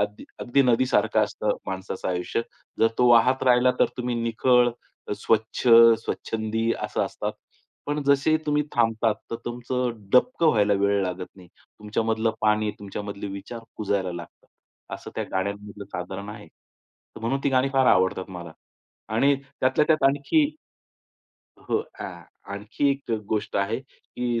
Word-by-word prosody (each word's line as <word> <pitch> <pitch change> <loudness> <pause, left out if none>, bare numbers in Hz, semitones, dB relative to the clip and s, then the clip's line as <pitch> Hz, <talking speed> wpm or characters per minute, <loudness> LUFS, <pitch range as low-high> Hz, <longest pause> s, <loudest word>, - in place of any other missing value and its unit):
अगदी 105 0 -3 0.2
अगदी 135 +3 +2
नदीसारखं 125 0 +2
असतं - - -2
माणसाचं 95 0 -4
आयुष्य. 90 +4 -1 0.4
जर 115 - +6
तो 125 - +5
वाहत 120 +2 +5
राहिला 125 0 +5
तर - - +6
तुम्ही 125 -1 -2
निखळ, 120 +2 +3 0.4
अ, - - -1
स्वच्छ, 110 +2 0 0.4
स्वच्छंदी 110 +1 -2
असं - - -1
असतात. - - -4 0.5
पण 145 +1 -1
जसेही 140 +3 +4
तुम्ही 150 0 +2
थांबतात, 115 -1 +2 0.2
तर 115 - -2
तुमचं 125 +1 -2 0.2
डबकं 165 - +4
व्हायला 105 -6 +3
वेळ 100 0 +2
लागत 90 0 -3
नाही. 90 -2 -15 0.3
तुमच्यामधलं 110 +1 0
पाणी, 105 0 +2
तुमच्यामधले 100 0 -6
विचार 100 +4 -7 0.2
कुजायला 100 -3 -1
लागतात. 85 0 -10 0.5
असं - - -9
त्या - - -2
गाण्यांमधलं 100 +2 -4
साधारण 95 +3 -5
आहे. 105 -4 -9 0.7
म्हणून 125 +5 -1
ती - - +4
गाणी 130 0 +3
फार 135 -1 +3
आवडतात 95 -1 +2
मला. 85 -3 -8 0.6
आणि 140 +5 +4 0.3
त्यातल्या 130 +3 +3
त्यात 155 -1 +2
आणखी 145 - +2 1.1
हो - - -1 0.2
आ - - -3 0.5
आणखी 105 +8 -1
एक 140 -2 -4 0.2
गोष्ट 105 -1 -2
आहे, 100 +3 0
की 125 -3 -4
115 Hz, 140 wpm, -25 LUFS, 100-130 Hz, 1.1 s, जर